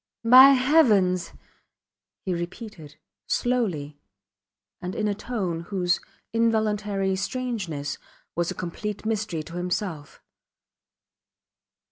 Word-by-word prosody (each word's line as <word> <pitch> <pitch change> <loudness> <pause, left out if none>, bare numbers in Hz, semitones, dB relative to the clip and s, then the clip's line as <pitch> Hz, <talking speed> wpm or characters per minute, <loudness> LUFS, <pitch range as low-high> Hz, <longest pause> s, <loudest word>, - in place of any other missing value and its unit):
By 260 +4 +9
Heavens! 235 - +3 0.9
he 185 - 0
repeated, 175 -3 -7 0.3
slowly, 175 -13 -1 0.8
and 180 0 -5
in 215 - 0
a 205 - +1
tone 200 -6 -3
whose 180 -2 0 0.3
involuntary 210 -4 +1
strangeness 190 - -3 0.4
was 170 0 0
a - - -4
complete 205 +4 -5
mystery 210 -7 -2
to 170 +3 -9
himself. 175 -4 -4
195 Hz, 90 wpm, -25 LUFS, 175-225 Hz, 0.9 s, By